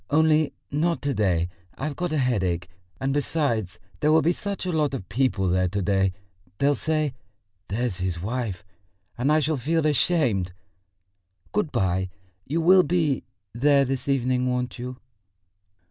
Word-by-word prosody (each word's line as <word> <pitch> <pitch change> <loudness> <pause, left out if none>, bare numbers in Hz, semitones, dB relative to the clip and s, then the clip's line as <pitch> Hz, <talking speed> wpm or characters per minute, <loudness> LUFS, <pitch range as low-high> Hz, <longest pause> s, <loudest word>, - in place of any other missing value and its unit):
Only 155 0 +3 0.2
not 165 +4 +1
to 145 -1 0
day; 90 -7 +1 0.3
I've 145 +1 -3
got 175 -2 -2
a 155 - +1
headache, 95 - 0 0.3
and 135 +1 0
besides, 130 - 0 0.2
there 150 - +3
will 160 -1 +5
be 165 - +4
such 200 +2 -4
a 180 - -1
lot 150 -4 +1
of 105 -8 -6
people 115 -6 +1
there 90 +1 +2
to 100 +3 -2
day.... 95 -1 +2 0.4
They'll 140 +1 +3
say, 155 -1 0 0.5
'That's 110 -2 -2
his 90 -2 -2
wife,' 105 -1 -3 0.5
and 130 +5 +1
I 155 - +5
shall 155 0 +1
feel 155 +5 0
ashamed.... 130 - +2 1.0
Good 205 -7 0
bye. 95 0 0 0.4
You 160 +5 0
will 185 +3 +7
be... 160 -5 0 0.3
there 140 +3 +4
this 135 +1 -3
evening, 125 -1 +1
won't 125 0 -2
you?" 125 +1 -5
135 Hz, 155 wpm, -25 LUFS, 105-155 Hz, 1.0 s, will